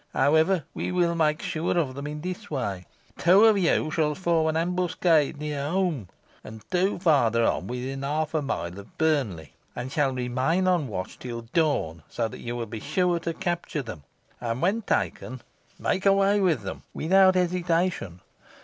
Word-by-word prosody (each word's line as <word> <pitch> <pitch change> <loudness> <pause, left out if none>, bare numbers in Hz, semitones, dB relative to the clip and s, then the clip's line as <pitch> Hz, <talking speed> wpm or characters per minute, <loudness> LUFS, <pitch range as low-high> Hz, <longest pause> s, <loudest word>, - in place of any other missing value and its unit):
However, 160 +3 +3
we - - -3
will 175 -2 +2
make 155 0 +1
sure 175 -2 -1
of 145 -6 0
them 140 +2 -6
in 150 0 -6
this 185 +5 -6
way. 100 - -3 0.3
Two 190 +5 +6
of 220 -1 +6
you 170 -4 +1
shall 150 -2 +1
form 170 -3 +1
an 160 0 0
ambuscade 170 -3 +1
near 145 -1 -3
Holme 170 - 0 0.4
and 110 0 -10
two 185 +2 +1
further 120 - +3
on - - 0
within 130 +2 -4
half 150 +3 -1
a 155 - +1
mile 90 -9 -4
of 100 - -14
Burnley, 130 - 0 0.2
and 125 +2 -5
shall 140 -2 +1
remain 130 +8 0
on 175 -5 +2
the - - -9
watch 95 -2 -5
till 120 -2 -6
dawn, 145 - +1
so 115 - -1
that - - -10
you 120 0 -5
will 120 -1 -3
be 110 0 -7
sure 180 - 0
to 165 0 -4
capture 170 -4 -2
them, 105 - -8 0.4
and 115 0 -3
when 195 +9 +1
taken, 130 - -2 0.4
make 190 +1 0
away 195 +1 +4
with 165 - +1
them 95 - -6
without 185 +3 +4
hesitation. 175 - 0
155 Hz, 175 wpm, -26 LUFS, 125-180 Hz, 0.4 s, Two